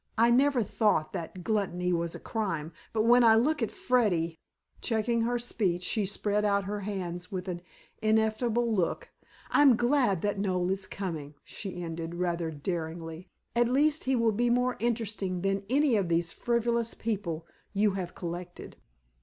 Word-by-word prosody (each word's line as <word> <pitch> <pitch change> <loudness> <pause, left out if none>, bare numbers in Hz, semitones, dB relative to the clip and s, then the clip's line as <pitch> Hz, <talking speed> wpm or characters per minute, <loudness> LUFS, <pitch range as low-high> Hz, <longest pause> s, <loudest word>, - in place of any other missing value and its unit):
I 230 +2 +5
never 260 0 +4
thought 205 -6 +1
that 180 0 -6
gluttony 180 -4 0
was 170 -1 -1
a - - -7
crime. 170 -8 -3 0.2
But 220 -1 +1
when 240 +2 +6
I 225 -1 +7
look 290 +6 +2
at 225 - +1
Freddy" 175 -10 +1 0.4
checking 230 0 +1
her 240 +2 +1
speech, 195 -7 -1
she 210 +2 +1
spread 205 +1 0
out 200 -1 +2
her 205 +2 -3
hands 180 -3 -4
with 185 -1 -4
an 175 -2 -4 0.4
ineffable 220 +2 +2
look 180 -5 -1 0.4
"I'm 280 -4 +6
glad 240 - +2
that 205 -1 0
Noel 185 -2 0
is 190 0 -3
coming," 160 -7 -5
she 180 -3 -6
ended, 165 0 -5
rather 175 -2 -1
daringly. 165 +2 -5 0.3
"At 240 0 +3
least 295 +4 +2
he 265 0 +2
will 230 -2 +3
be 240 +3 +1
more 250 +1 +2
interesting 215 -6 -1
than 195 +1 0
any 280 -1 +3
of 190 -4 0
these 165 0 +1
frivolous 235 -1 0
people 190 -8 -3 0.3
you 205 0 +2
have 185 -2 -5
collected." 175 0 -7
205 Hz, 160 wpm, -29 LUFS, 175-235 Hz, 0.4 s, I